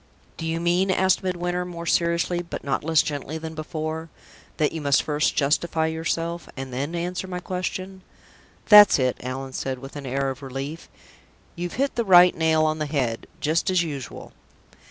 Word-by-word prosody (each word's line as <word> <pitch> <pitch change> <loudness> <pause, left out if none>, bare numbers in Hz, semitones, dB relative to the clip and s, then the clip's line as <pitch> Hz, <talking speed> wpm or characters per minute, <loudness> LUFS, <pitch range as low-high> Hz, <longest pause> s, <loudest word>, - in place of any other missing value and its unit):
"Do 165 - -5
you 165 +1 -1
mean," 175 +3 +2
asked 190 0 +3
Midwinter, 180 -1 -2
more 170 -1 -7
seriously, 170 +1 +1
but 170 - -7
not 140 - -1
less 160 0 +3
gently 145 +1 -4
than 160 0 -7
before, 155 +1 -5 0.5
"that 150 - +2
you 160 - -5
must 140 -2 +3
first 150 0 0
justify 160 +3 +1
yourself, 165 +1 -2
and 135 -1 -6
then 140 +6 -3
answer 180 +2 -3
my 180 -1 -4
question?" 185 +1 -4 0.7
"That's 210 -1 +9
it!" 130 -2 0
said - - -12
Allan, 135 +1 -5 0.3
with 135 +2 -10
an 140 -2 -6
air 135 +1 -1
of 130 - -9
relief. 135 +4 -6 0.7
"You're 175 +1 -3
hit 275 +8 -1
the 235 - +2
right 180 -3 +7
nail 160 -1 +2
on 155 0 0
the 155 - -2
head, 130 -6 -2
just 160 +5 +1
as 185 -2 +3
usual." 140 -7 -7
160 Hz, 175 wpm, -24 LUFS, 145-175 Hz, 0.7 s, That's